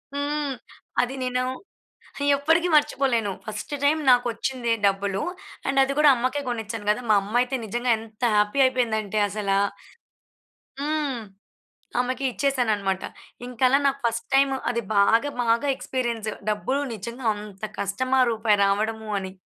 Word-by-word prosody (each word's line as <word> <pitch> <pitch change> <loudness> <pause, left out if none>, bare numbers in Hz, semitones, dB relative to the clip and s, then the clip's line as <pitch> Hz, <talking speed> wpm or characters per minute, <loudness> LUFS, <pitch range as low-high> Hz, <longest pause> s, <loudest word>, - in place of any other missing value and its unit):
హ్మ్. 290 0 -1 0.5
అది 250 +2 -2
నేను 250 0 0 0.9
ఎప్పటికీ 325 +5 +2
మర్చిపోలేను. 260 -7 +2
ఫస్టు 215 +6 -5
టైమ్ 310 +2 +3
నాకొచ్చిందే 245 0 +1
డబ్బులు. 195 0 0 0.4
అండ్ 270 0 +1
అది 270 +1 +1
గూడా 300 -1 +7
అమ్మకే 255 +4 -1
గొనిచ్చాను 225 -3 -4
గదా! 215 +4 0
మా - - +7
అమ్మయితే 245 +6 0
నిజంగా 240 +4 -1
ఎంత 220 +1 -14
హ్యాపీ 210 +5 +2
అయిపోయిందంటే 220 -5 0
అసలా 200 -1 0 1.2
హ్మ్. 290 -4 -1 0.8
ఆమెకి 255 +2 -1
ఇచ్చేశానన్నమాట. 220 -9 0 0.4
ఇంకలా 250 +2 +3
నాకు 275 0 0
ఫస్ట్ 230 0 -1
టైమ్ 270 0 +4 0.2
అది 235 -1 -1
బాగా, 225 +7 +4
మాగా 235 +3 +2
ఎక్స్‌పీరియన్స్. 235 -5 -3 0.2
డబ్బులు 255 +7 -1
నిజంగా 235 +4 -7
అంత 205 -1 -11 0.2
కష్టమా! 255 +7 +1
రూపాయి 220 -2 +2
రావడము 215 +2 -1
అని? 190 -1 -6
240 Hz, 125 wpm, -24 LUFS, 215-265 Hz, 1.2 s, గూడా